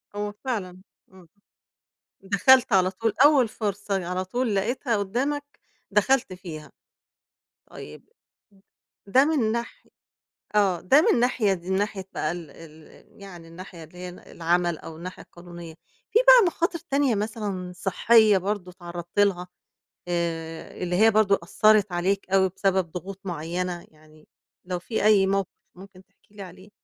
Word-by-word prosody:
هو 205 Hz, 0 st, -3 dB
فعلًا 185 Hz, -8 st, -4 dB, 0.3 s
إمم، 185 Hz, -2 st, -17 dB, 0.9 s
دَخلت 215 Hz, +5 st, +4 dB
على 185 Hz, -1 st, +3 dB
طول 225 Hz, +3 st, -2 dB
أوّل 290 Hz, -5 st, +5 dB
فرصة 205 Hz, -3 st, -3 dB
على 180 Hz, +1 st, -3 dB
طول 235 Hz, +2 st, -1 dB
لقيتها 230 Hz, +4 st, -1 dB
قُدَّامك 275 Hz, +9 st, -3 dB, 0.3 s
دخلت 210 Hz, +1 st, +2 dB
فيها، 170 Hz, -4 st, -10 dB, 1.0 s
طيّب -, -, -12 dB, 1.0 s
ده 255 Hz, +7 st, +4 dB
من 280 Hz, -8 st, +1 dB
ناح 235 Hz, -, -5 dB, 0.7 s
آه، 195 Hz, -4 st, +2 dB
ده 270 Hz, -, +5 dB
من -, -, +2 dB
ناحية 235 Hz, -5 st, +1 dB
من 180 Hz, +1 st, -5 dB
ناحية 200 Hz, -1 st, -3 dB
بقى 155 Hz, -, -2 dB
ال 170 Hz, -4 st, -9 dB
ال 160 Hz, +5 st, -17 dB
يعني 175 Hz, -4 st, -11 dB
الناحية 170 Hz, 0 st, -11 dB
اللي 165 Hz, +3 st, -18 dB
هي 180 Hz, 0 st, -6 dB
ال 180 Hz, -, -12 dB
العَمَل 175 Hz, 0 st, -1 dB
أو 160 Hz, -, -10 dB
الناحية 180 Hz, +3 st, -9 dB
القانونية، 175 Hz, -2 st, -12 dB, 0.4 s
في 455 Hz, -, +4 dB
بقى -, -, +8 dB
مخاطر 340 Hz, 0 st, -1 dB
تانية 280 Hz, -7 st, 0 dB
مثلًا 205 Hz, -3 st, -4 dB
صحّية 210 Hz, +3 st, +4 dB
برضه 190 Hz, -1 st, -3 dB
اتعرضت 175 Hz, 0 st, -7 dB
لها 190 Hz, -3 st, +2 dB, 0.6 s
آآ، 165 Hz, -1 st, -4 dB
اللي 180 Hz, 0 st, -1 dB
هي 220 Hz, +4 st, +5 dB
برضه 205 Hz, -2 st, +3 dB
أثّرت 210 Hz, +2 st, +3 dB
عليك 185 Hz, +3 st, -1 dB
أوي 190 Hz, -1 st, +3 dB
بسبب 190 Hz, -2 st, -1 dB
ضغوط 190 Hz, +3 st, -7 dB
معيّنة، 175 Hz, +1 st, -4 dB
يعني 155 Hz, 0 st, -22 dB, 0.4 s
لو 180 Hz, -1 st, -3 dB
في 220 Hz, +5 st, -3 dB
أي 205 Hz, -3 st, +5 dB
موقف 195 Hz, -1 st, 0 dB, 0.3 s
ممكن 190 Hz, 0 st, -15 dB
تحكي 200 Hz, +1 st, -32 dB
لي 205 Hz, -, -10 dB
عليه؟ 185 Hz, +2 st, -13 dB
195 Hz, 145 wpm, -25 LUFS, 175-215 Hz, 1.0 s, بقى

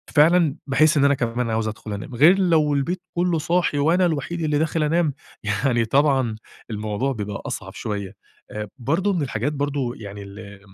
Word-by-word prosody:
فعلًا 160 Hz, -1 st, +5 dB
باحس 155 Hz, +3 st, +4 dB
إن 140 Hz, -, +4 dB
أنا 140 Hz, -, +5 dB
كمان 120 Hz, -2 st, -1 dB
عاوز 110 Hz, 0 st, 0 dB
أدخُل 110 Hz, 0 st, -6 dB
أنام، 105 Hz, +5 st, -6 dB
غير 170 Hz, +10 st, +6 dB
لو 160 Hz, -5 st, +3 dB
البيت 170 Hz, +6 st, -1 dB, 0.2 s
كُلُّه 175 Hz, -1 st, +2 dB
صاحي 170 Hz, -1 st, +1 dB
وأنا 165 Hz, +6 st, +3 dB
الوحيد 170 Hz, +1 st, -2 dB
اللي 150 Hz, -2 st, +1 dB
داخل 160 Hz, +1 st, 0 dB
أنام، 155 Hz, 0 st, +1 dB, 0.3 s
يعني 115 Hz, +3 st, +1 dB
طبعًا 135 Hz, -2 st, +2 dB, 0.4 s
الموضوع 105 Hz, +5 st, -2 dB
بيبقى 105 Hz, -3 st, -5 dB
أصعب -, -, -5 dB
شوية، 100 Hz, -2 st, -5 dB, 0.4 s
آآ 105 Hz, 0 st, -5 dB
برضو 165 Hz, -, 0 dB
من 175 Hz, -, -1 dB
الحاجات 130 Hz, +1 st, -2 dB
برضو 140 Hz, -3 st, -2 dB
يعني 100 Hz, -3 st, -9 dB
ال 100 Hz, 0 st, -11 dB
140 Hz, 175 wpm, -23 LUFS, 110-160 Hz, 0.4 s, غير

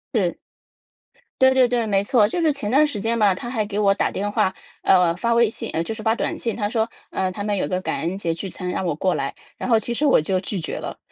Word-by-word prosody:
是。 -, -, +1 dB, 1.0 s
对 260 Hz, 0 st, +6 dB
对 255 Hz, -1 st, +5 dB
对， 240 Hz, -2 st, 0 dB
没 195 Hz, -2 st, +2 dB
错， 210 Hz, +1 st, +3 dB
就 225 Hz, +12 st, -2 dB
是 315 Hz, -3 st, +3 dB
前 250 Hz, -6 st, -3 dB
段 300 Hz, +3 st, +5 dB
时 215 Hz, -8 st, -4 dB
间 230 Hz, +1 st, 0 dB
吧， 200 Hz, -3 st, +4 dB
他 240 Hz, -, -6 dB
还 220 Hz, -4 st, -1 dB
给 205 Hz, 0 st, -5 dB
我 200 Hz, -1 st, +4 dB
打 -, -, 0 dB
电 205 Hz, +1 st, -3 dB
话， 190 Hz, -, +1 dB, 0.3 s
呃 180 Hz, -3 st, +4 dB
发 235 Hz, +4 st, +1 dB
微 235 Hz, -2 st, +4 dB
信 -, -, -6 dB
呃 165 Hz, -, -1 dB
就 220 Hz, -, -4 dB
是 220 Hz, -, -8 dB
发 220 Hz, +1 st, +2 dB
短 -, -, -2 dB
信， 230 Hz, -, -2 dB
他 205 Hz, -3 st, -1 dB
说， 225 Hz, 0 st, 0 dB, 0.2 s
呃， 190 Hz, -1 st, -1 dB
他 200 Hz, +2 st, -5 dB
们 205 Hz, -1 st, -1 dB
有 -, -, 0 dB
个 185 Hz, 0 st, -1 dB
感 -, -, -2 dB
恩 175 Hz, +4 st, -2 dB
节 170 Hz, -4 st, -1 dB
聚 185 Hz, +4 st, -6 dB
餐 180 Hz, +1 st, -5 dB
让 185 Hz, -, -2 dB
我 160 Hz, -4 st, 0 dB
过 185 Hz, +3 st, 0 dB
来， 135 Hz, 0 st, -3 dB, 0.2 s
然 -, -, -4 dB
后 230 Hz, -, +5 dB
其 235 Hz, +2 st, -2 dB
实 295 Hz, -, 0 dB
我 270 Hz, -, +5 dB
就 185 Hz, +4 st, 0 dB
拒 185 Hz, 0 st, -4 dB
绝 -, -, -4 dB
了。 -, -, -6 dB
205 Hz, 295 characters per minute, -22 LUFS, 185-235 Hz, 1.0 s, 对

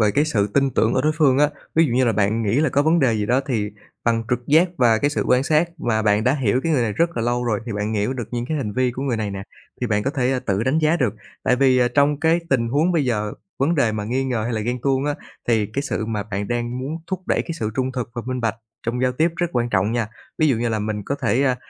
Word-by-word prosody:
về 105 Hz, -1 st, +4 dB
cái 145 Hz, +8 st, +2 dB
sự 105 Hz, -10 st, +1 dB
tin 135 Hz, +6 st, +1 dB
tưởng 110 Hz, -, +1 dB
ở -, -, +2 dB
đối 155 Hz, +1 st, +2 dB
phương 135 Hz, -4 st, +4 dB
á. 145 Hz, 0 st, +5 dB, 0.3 s
Ví 165 Hz, +1 st, +5 dB
dụ 120 Hz, -, -2 dB
như 130 Hz, 0 st, +3 dB
là 115 Hz, -, +2 dB
bạn 110 Hz, +2 st, +1 dB
nghĩ 115 Hz, +7 st, +1 dB
là 155 Hz, -, +3 dB
có 140 Hz, +3 st, +2 dB
vấn 165 Hz, +2 st, +3 dB
đề 125 Hz, -4 st, +3 dB
gì 105 Hz, -1 st, -1 dB
đó 125 Hz, +4 st, +2 dB
thì 110 Hz, -6 st, -1 dB, 0.3 s
bằng 115 Hz, -1 st, +2 dB
trực 125 Hz, 0 st, -1 dB
giác 160 Hz, +5 st, +5 dB
và 115 Hz, -4 st, +4 dB
cái 145 Hz, -, +1 dB
sự -, -, -1 dB
quan 125 Hz, +1 st, +3 dB
sát, 155 Hz, +3 st, +2 dB
và 110 Hz, -6 st, 0 dB
bạn 105 Hz, 0 st, +2 dB
đã 130 Hz, +3 st, +3 dB
hiểu 130 Hz, -2 st, +1 dB
cái 165 Hz, -, 0 dB
người 130 Hz, -5 st, +2 dB
này 110 Hz, -3 st, -1 dB
rất 170 Hz, +5 st, 0 dB
là 115 Hz, -, 0 dB
lâu 120 Hz, +1 st, 0 dB
rồi, 115 Hz, -2 st, 0 dB
thì 115 Hz, -, -3 dB
bạn 105 Hz, +2 st, -2 dB
hiểu 105 Hz, +5 st, 0 dB
được 120 Hz, -5 st, -5 dB
những 120 Hz, 0 st, -3 dB
cái 155 Hz, -, -2 dB
hành 105 Hz, -7 st, -3 dB
vi 130 Hz, +2 st, +1 dB
của 125 Hz, +2 st, -5 dB
người 130 Hz, -4 st, 0 dB
này 105 Hz, -2 st, -2 dB
nè 95 Hz, 0 st, -5 dB, 0.4 s
thì 125 Hz, -, 0 dB
bạn 105 Hz, -1 st, 0 dB
có 135 Hz, -, 0 dB
thể 130 Hz, -2 st, 0 dB
tự 100 Hz, +2 st, +1 dB
đánh 130 Hz, +6 st, +1 dB
giá 160 Hz, +2 st, +3 dB
được. 125 Hz, -, 0 dB, 0.3 s
Tại 125 Hz, -, +2 dB
vì, 130 Hz, -1 st, +4 dB
ờ, 125 Hz, -1 st, +3 dB
trong 145 Hz, +2 st, +2 dB
cái 165 Hz, +1 st, +3 dB
tình 115 Hz, -4 st, +2 dB
huống 155 Hz, +8 st, +2 dB
bây 155 Hz, -5 st, +2 dB
giờ, 105 Hz, -4 st, -1 dB, 0.3 s
vấn 150 Hz, +6 st, +2 dB
đề 120 Hz, -7 st, +2 dB
mà 105 Hz, -1 st, -3 dB
nghi 130 Hz, +4 st, -1 dB
ngờ 120 Hz, -4 st, -1 dB
hay 120 Hz, -, -2 dB
là 110 Hz, -, -1 dB
ghen 120 Hz, +3 st, -2 dB
tuông 135 Hz, 0 st, +1 dB
á, 145 Hz, -, 0 dB, 0.3 s
thì 110 Hz, -3 st, +2 dB
cái 135 Hz, +7 st, -3 dB
sự 110 Hz, -6 st, -3 dB
mà 105 Hz, -2 st, -2 dB
bạn 100 Hz, -1 st, -4 dB
đang 120 Hz, +1 st, -2 dB
muốn 140 Hz, +5 st, -4 dB
thúc 190 Hz, -2 st, -3 dB
đẩy- -, -, +1 dB
cái 170 Hz, -, -5 dB
sự 110 Hz, 0 st, -1 dB
trung 130 Hz, 0 st, 0 dB
thực 125 Hz, -2 st, -4 dB
và 120 Hz, -, -4 dB
minh 130 Hz, 0 st, -2 dB
bạch 115 Hz, -2 st, 0 dB, 0.3 s
trong 125 Hz, +2 st, -1 dB
giao 125 Hz, 0 st, +2 dB
tiếp 160 Hz, +6 st, +2 dB
rất 175 Hz, -, +1 dB
quan 120 Hz, 0 st, 0 dB
trọng 105 Hz, +3 st, +1 dB
nha. 115 Hz, -3 st, 0 dB, 0.3 s
Ví 155 Hz, -1 st, +4 dB
dụ 125 Hz, -, +2 dB
như 120 Hz, +1 st, -1 dB
là 110 Hz, -, -1 dB
mình 105 Hz, 0 st, -3 dB
có 140 Hz, -, -1 dB
thể, 125 Hz, +3 st, +2 dB
à, 130 Hz, -2 st, +2 dB
125 Hz, 305 wpm, -22 LUFS, 110-140 Hz, 0.4 s, á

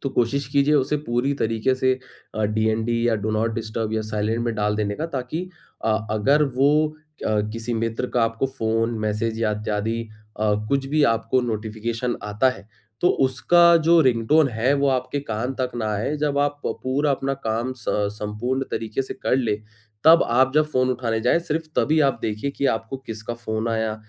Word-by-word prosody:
तो 135 Hz, -, -1 dB
कोशिश 125 Hz, +3 st, 0 dB
कीजिए 145 Hz, +1 st, +3 dB
उसे 145 Hz, +1 st, +2 dB
पूरी 120 Hz, +4 st, +1 dB
तरीके 115 Hz, +1 st, 0 dB
से 130 Hz, 0 st, +2 dB, 0.4 s
अ, 110 Hz, -, 0 dB
डीएनडी 110 Hz, +2 st, 0 dB
या 115 Hz, -, +3 dB
डू 105 Hz, +1 st, -2 dB
नॉट 110 Hz, +1 st, 0 dB
डिस्टर्ब 110 Hz, -1 st, -3 dB
या 110 Hz, -, 0 dB
साइलेंट 110 Hz, +2 st, -1 dB
में 115 Hz, -1 st, -1 dB
डाल 105 Hz, 0 st, 0 dB
देने 105 Hz, -1 st, -1 dB
का 160 Hz, -, -2 dB
ताकि 155 Hz, +5 st, -4 dB, 0.4 s
अ, 110 Hz, -1 st, +3 dB
अगर 135 Hz, +8 st, +3 dB
वो 135 Hz, +2 st, +4 dB, 0.6 s
अ, 105 Hz, -1 st, +2 dB
किसी 115 Hz, +1 st, -3 dB
मित्र 115 Hz, +2 st, -1 dB
का 120 Hz, -, +3 dB
आपको 115 Hz, +3 st, -1 dB
फ़ोन, 115 Hz, -3 st, -1 dB
मैसेज 110 Hz, +1 st, -1 dB
या 110 Hz, -, +2 dB
इत्यादि 105 Hz, +2 st, -2 dB, 0.4 s
अ, 105 Hz, -1 st, +2 dB, 0.2 s
कुछ 140 Hz, -1 st, 0 dB
भी 150 Hz, +2 st, +1 dB
आपको 115 Hz, +3 st, 0 dB
नोटिफिकेशन 115 Hz, +1 st, -3 dB
आता 105 Hz, +5 st, +2 dB
है 125 Hz, -, -10 dB, 0.3 s
तो 175 Hz, -, +4 dB, 0.2 s
उसका 170 Hz, +7 st, +5 dB
जो 170 Hz, 0 st, +7 dB
रिंगटोन 135 Hz, +3 st, +3 dB
है 120 Hz, +4 st, +1 dB
वो 140 Hz, 0 st, +2 dB
आपके 130 Hz, +1 st, -1 dB
कान 125 Hz, 0 st, -3 dB
तक 125 Hz, -, 0 dB
ना 110 Hz, -2 st, -2 dB
आए। 115 Hz, +9 st, -1 dB
जब 145 Hz, -1 st, 0 dB
आप 145 Hz, 0 st, 0 dB
प -, -, +1 dB
पूरा 140 Hz, +3 st, +1 dB
अपना 135 Hz, 0 st, 0 dB
काम 120 Hz, +4 st, -1 dB
सं 105 Hz, -3 st, -1 dB
संपूर्ण 105 Hz, +6 st, -3 dB
तरीके 115 Hz, +4 st, -2 dB
से 130 Hz, -, -7 dB
कर -, -, 0 dB
लें 115 Hz, -5 st, 0 dB, 0.5 s
तब 165 Hz, +2 st, +8 dB
आप 130 Hz, +2 st, +3 dB
जब 155 Hz, 0 st, +5 dB
फ़ोन 130 Hz, 0 st, +2 dB
उठाने 115 Hz, -3 st, -1 dB
जाए 125 Hz, +8 st, +3 dB
सिर्फ 165 Hz, -1 st, -2 dB
तभी 155 Hz, +1 st, +3 dB
आप 135 Hz, -, -3 dB
देखिए 110 Hz, +6 st, -2 dB
कि 140 Hz, 0 st, -1 dB
आपको 115 Hz, +2 st, -1 dB
किसका 115 Hz, -2 st, -6 dB
फ़ोन 110 Hz, -1 st, -3 dB
आया? 110 Hz, -1 st, -1 dB
120 Hz, 190 wpm, -23 LUFS, 110-135 Hz, 0.6 s, तब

